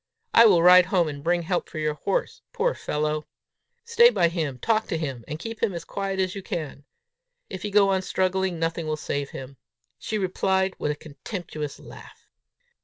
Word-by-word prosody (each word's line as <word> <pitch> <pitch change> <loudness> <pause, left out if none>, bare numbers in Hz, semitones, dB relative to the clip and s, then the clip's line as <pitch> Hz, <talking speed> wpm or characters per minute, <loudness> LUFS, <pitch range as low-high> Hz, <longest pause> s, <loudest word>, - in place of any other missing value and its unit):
I 230 0 +8
will 175 -5 +5
ride 180 0 +8
home 180 -3 +2
and 140 -2 -6
bring 175 +1 +1
help 175 +1 -2
for - - -9
your 155 -1 0
horse, - - -2
poor - - +1
fellow! 150 0 -2 0.6
Stay 470 0 +6
by 170 - +2
him, 155 -6 -3
talk 220 - 0
to 165 - -2
him, 135 -7 -4
and 150 - -5
keep 225 +7 -7
him 205 -6 0
as 165 -1 -6
quiet 195 -1 -3
as 185 -1 0
you 195 - -6
can. 150 -6 -6 0.7
If 190 - -6
he 210 - -3
go 200 -1 +4
on 190 -1 +2
struggling, 190 -1 0
nothing 165 0 -2
will 155 0 -1
save 140 -2 -3
him." 135 +1 -9 0.4
She 215 - -3
replied 190 0 0
with - - -1
a - - -3
contemptuous 155 -1 -7
laugh. - - -14
175 Hz, 190 wpm, -25 LUFS, 155-195 Hz, 0.7 s, I